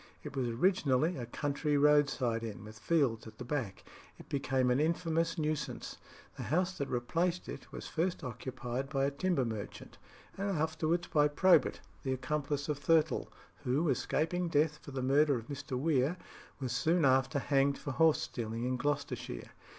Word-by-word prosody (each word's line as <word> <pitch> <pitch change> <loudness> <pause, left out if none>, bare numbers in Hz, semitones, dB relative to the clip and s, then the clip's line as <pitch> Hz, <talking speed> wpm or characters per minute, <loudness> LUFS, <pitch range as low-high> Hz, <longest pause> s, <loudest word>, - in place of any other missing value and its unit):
It 145 -2 -7
was 130 -2 0
originally 155 +2 +2
a 120 -5 -5
country 145 +3 -1
roadside 140 -5 +3
inn, 110 -3 -6
with 110 0 -11
fields 135 -9 +1
at 110 0 -12
the - - -7
back. 120 -8 -3 0.3
It - - -14
became 130 -2 +1
an 125 - +3
infamous 165 +1 +1
nuisance. 155 -1 -2 0.4
The - - -5
house 180 +4 0
that 140 - -2
replaced 165 +9 -1
it - - -8
was - - -7
first 175 +1 -1
occupied 125 +1 -4
by 135 -2 +1
a 140 - 0
timber 145 -2 0
merchant, 110 -3 -6 0.4
and 200 +1 -1
afterwards 160 +2 0
by 150 -1 +3
Probert, 180 +5 +4 0.2
the 130 -2 -1
accomplice 145 +2 -2
of 150 -2 -2
Thurtell, 155 +2 +2 0.3
who, 145 +5 +1
escaping 170 +6 0
death 150 -1 +2
for - - -11
the 135 -2 -3
murder 140 +2 +4
of 115 0 -9
Mr. 140 -2 -4
Weare, 145 +3 +1 0.4
was 130 -3 -3
soon 160 +7 +2
after 130 +2 +3
hanged 140 +1 +2
for 145 - -5
horse 160 +4 +4
stealing 115 -1 -4
in 125 +1 0
Gloucestershire. 145 - -3
140 Hz, 165 wpm, -33 LUFS, 130-160 Hz, 0.4 s, Probert